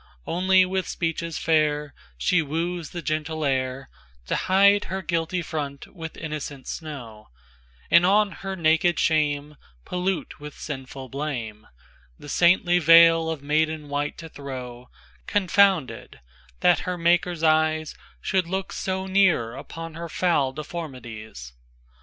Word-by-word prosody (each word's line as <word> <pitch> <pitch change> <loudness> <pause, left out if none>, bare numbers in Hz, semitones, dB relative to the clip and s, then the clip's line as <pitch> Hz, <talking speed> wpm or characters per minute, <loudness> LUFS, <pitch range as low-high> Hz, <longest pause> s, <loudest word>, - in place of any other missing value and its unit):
IIOnly 185 +2 +4
with 185 0 -2
speeches 165 -1 -3
fairShe 150 - 0
woos 165 +2 -3
the 175 -2 -7
gentle 155 0 -2
airTo 130 -2 -1 0.4
hide 200 +2 +4
her 190 0 -4
guilty 170 +1 -1
front 145 -3 -5
with 160 -2 -8
innocent 150 -4 -6
snow, 120 -9 -7 0.6
And 170 - +7
on 200 +2 +4
her 195 0 -6
naked 165 0 +2
shame, 150 -2 0 0.3
Pollute 180 -2 -3
with 150 0 -9
sinful 135 -2 -7
blame, 120 -7 -5 0.5
The 145 - -11
saintly 175 +2 +4
veil 165 0 +7
of 160 -3 -4
maiden 155 0 0
white 145 +1 -2
to 165 - -8
throw; 125 -4 -8 0.4
Confounded, 195 - +2 0.4
that - - +4
her 180 -1 -3
Maker's 170 0 +1
eyesShould 155 +3 0
look 190 +2 -3
so 190 0 -3
near 185 -12 +2
upon 165 +4 -8
her 165 +1 -7
foul 155 -7 +1
deformities. 125 - -8
160 Hz, 120 wpm, -24 LUFS, 145-175 Hz, 0.6 s, And